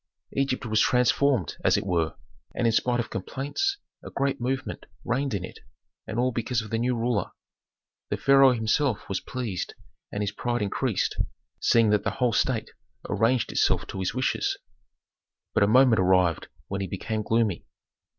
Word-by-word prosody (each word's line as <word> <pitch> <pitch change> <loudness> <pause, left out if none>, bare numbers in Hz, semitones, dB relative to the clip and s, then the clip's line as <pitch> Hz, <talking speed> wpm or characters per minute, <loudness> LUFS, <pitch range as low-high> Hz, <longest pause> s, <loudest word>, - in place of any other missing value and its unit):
Egypt 135 -2 0
was 110 -1 +1
transformed, 125 - +2
as - - +4
it - - -2
were, 85 -4 0 0.4
and - - 0
in 115 - +3
spite 120 +1 +2
of 120 - -3
complaints 145 - -2 0.3
a - - -7
great 135 -2 -1
movement 135 +3 -3 0.2
reigned 130 0 0
in 95 -2 -3
it, - - -12 0.5
and 110 - -4
all 125 +1 +2
because 115 0 -1
of 110 - -11
the 115 - 0
new 125 +1 +1
ruler. 115 -4 0 0.8
The - - -1
pharaoh 135 -1 +6
himself 115 +2 0
was 95 - -1
pleased 120 -9 -4 0.4
and 105 - -2
his 100 - -1
pride 120 -2 -2
increased, 100 - -1 0.4
seeing 115 -2 +4
that 105 -1 +2
the - - +1
whole 125 -3 +2
state 115 +1 0 0.4
arranged 115 +4 +1
itself - - +2
to 95 - -5
his 95 +4 -2
wishes. 130 +1 0 1.0
But - - +2
a 100 - +5
moment 125 0 +5
arrived 90 -3 +3 0.2
when 100 0 -3
he 95 - -2
became 110 +4 -3
gloomy. 110 -4 0
115 Hz, 170 wpm, -26 LUFS, 100-130 Hz, 1.0 s, pharaoh